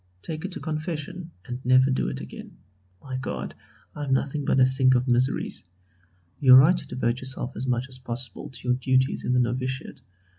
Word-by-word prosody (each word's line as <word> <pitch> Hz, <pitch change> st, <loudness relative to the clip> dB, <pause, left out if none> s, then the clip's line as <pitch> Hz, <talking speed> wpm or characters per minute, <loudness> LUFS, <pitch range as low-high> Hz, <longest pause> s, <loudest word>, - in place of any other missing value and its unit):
Take 160 Hz, +1 st, -5 dB
it 190 Hz, -, -5 dB
to -, -, -6 dB
confession, 155 Hz, +2 st, -5 dB, 0.2 s
and 125 Hz, +1 st, -6 dB
never 130 Hz, +1 st, +4 dB
do 130 Hz, -, 0 dB
it 65 Hz, -, -5 dB
again. -, -, -10 dB, 0.5 s
My 130 Hz, -1 st, -5 dB
God! 70 Hz, -, -5 dB, 0.4 s
I 150 Hz, -, -5 dB
am 135 Hz, -, 0 dB
nothing 140 Hz, +2 st, -1 dB
but 135 Hz, -, +2 dB
a 130 Hz, -, +7 dB
sink 130 Hz, 0 st, +4 dB
of 125 Hz, +1 st, +1 dB
miseries. 125 Hz, +2 st, +1 dB, 0.8 s
You 130 Hz, -3 st, +8 dB
are -, -, +11 dB
right 155 Hz, +8 st, +7 dB
to -, -, -8 dB
devote 120 Hz, -1 st, -1 dB
yourself 130 Hz, -1 st, -5 dB
as 130 Hz, -, -4 dB
much 125 Hz, 0 st, 0 dB
as 130 Hz, -1 st, -5 dB
possible 120 Hz, -3 st, -4 dB
to 130 Hz, -, -10 dB
your 125 Hz, -, +3 dB
duties 130 Hz, 0 st, +1 dB
in 125 Hz, -, +1 dB
the 125 Hz, -, +3 dB
novitiate. 130 Hz, +3 st, -2 dB
130 Hz, 200 wpm, -25 LUFS, 125-135 Hz, 0.8 s, are